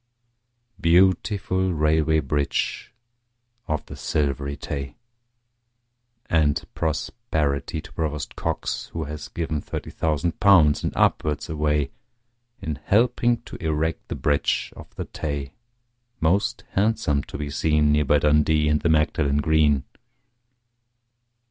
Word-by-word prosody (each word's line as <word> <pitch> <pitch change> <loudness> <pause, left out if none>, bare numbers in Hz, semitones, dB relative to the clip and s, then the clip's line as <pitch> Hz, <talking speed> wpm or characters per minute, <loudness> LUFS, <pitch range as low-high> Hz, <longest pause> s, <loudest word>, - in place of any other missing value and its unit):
Beautiful 95 +2 +2
Railway 80 +1 +2
Bridge 75 -2 -1 0.8
of 75 -2 -2
the - - -9
Silvery 70 -1 -1
Tay! 70 -2 -5 1.3
And 75 -3 +2
prosperity 80 -3 -2
to 85 0 -14
Provost 75 -2 -3
Cox, - - -3
who 80 - -2
has 75 0 -6
given 80 -3 -3
Thirty - - -6
thousand 80 +1 -1
pounds 85 -8 +5
and - - 0
upwards 75 -1 +1
away 75 -2 0 0.7
In 75 -2 -3
helping 120 +4 +2
to - - -9
erect 80 0 -1
the - - -4
Bridge 75 -1 0
of - - -11
the - - -4
Tay, 70 -2 -4 0.7
Most 90 +6 +1
handsome 105 -8 +1
to - - -7
be 75 0 -4
seen, 75 0 +2
Near 75 0 +3
by 75 +2 +4
Dundee 75 +1 +3
and 75 0 +2
the 85 - +1
Magdalen 75 -2 +2
Green. 75 -2 +3
75 Hz, 115 wpm, -24 LUFS, 75-80 Hz, 1.3 s, pounds